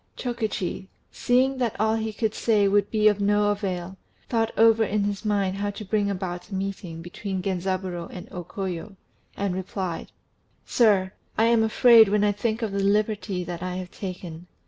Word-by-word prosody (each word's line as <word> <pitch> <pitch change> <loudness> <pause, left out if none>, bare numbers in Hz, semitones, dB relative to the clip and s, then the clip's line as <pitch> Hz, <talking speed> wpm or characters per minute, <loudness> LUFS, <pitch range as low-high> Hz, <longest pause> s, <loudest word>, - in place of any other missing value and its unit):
Chokichi, 220 -6 -3 0.2
seeing 260 +2 +2
that 240 -4 -1
all 220 0 +2
that - - -2
he 220 0 -2
could 215 0 -1
say 210 -3 +2
would 200 0 +2
be 215 -1 +3
of 205 -1 +3
no 205 +1 +3
avail, 190 -2 -3 0.3
thought 225 -2 +1
over 225 0 +5
in 210 -1 0
his 205 0 -2
mind 200 -3 0
how 205 +1 -1
to 205 +1 -7
bring 205 0 +1
about 180 -1 -4
a 195 - -5
meeting 190 -4 -5
between 190 +1 -5
Genzaburô 185 -2 -2
and 180 - -8
O 180 - -6
Koyo, 190 +2 -5 0.4
and 200 -2 -1
replied 185 -2 -4 0.5
"Sir, 200 -5 +3 0.2
I 225 - +4
am 230 -1 +4
afraid 220 0 +6
when 210 0 +2
I 205 - +4
think 220 +3 -2
of 220 - -1
the 200 - -2
liberty 205 -2 0
that 175 -1 -6
I 180 0 -3
have 185 -1 -6
taken. 180 -3 -7
200 Hz, 185 wpm, -25 LUFS, 185-220 Hz, 0.5 s, afraid